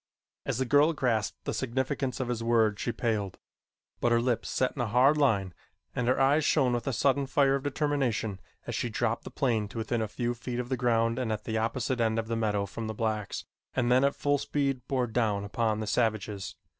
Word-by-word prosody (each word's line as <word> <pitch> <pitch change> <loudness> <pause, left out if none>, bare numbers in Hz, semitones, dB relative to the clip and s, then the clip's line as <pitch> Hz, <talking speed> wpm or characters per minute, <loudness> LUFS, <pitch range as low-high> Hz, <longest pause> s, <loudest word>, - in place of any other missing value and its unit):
As - - 0
the 130 - 0
girl 145 +5 +4
grasped 120 -8 -1
the - - -1
significance 130 +1 -2
of 130 - -1
his 120 -2 -2
words 110 -3 +2
she 120 - 0
paled, 110 -5 -2 0.6
but 120 - +2
her 120 - +4
lips 120 -1 0
set 130 - +1
in 135 - -2
a 120 - 0
hard 125 +6 +4
line 105 -11 +2 0.4
and 125 - -1
her 130 +1 +2
eyes 140 +3 +4
shone 135 -5 +3
with 120 +1 -2
a - - +2
sudden 135 +2 +1
fire 135 0 +3
of 140 - 0
determination 135 -8 -1 0.3
as - - -4
she - - -1
dropped - - -1
the - - -6
plane 115 -5 0
to 100 - -10
within 115 +1 -1
a 110 - -1
few 120 +3 -2
feet 120 +1 -5
of 125 0 -4
the 130 - +1
ground 115 -1 +1
and 120 -3 -1
at 105 -1 -3
the 110 -1 -1
opposite 120 +2 -1
end 110 -1 +1
of 110 0 -2
the 115 - 0
meadow 105 -3 0
from 110 +3 -6
the 110 - -4
blacks 110 -2 -2 0.3
and 125 -2 +1
then 130 +2 +5
at 140 - +2
full 145 0 +1
speed 140 -3 -1
bore 130 -2 +1
down 110 -4 0
upon 110 +1 0
the - - -2
savages. 105 -3 -1
120 Hz, 225 wpm, -29 LUFS, 110-130 Hz, 0.6 s, then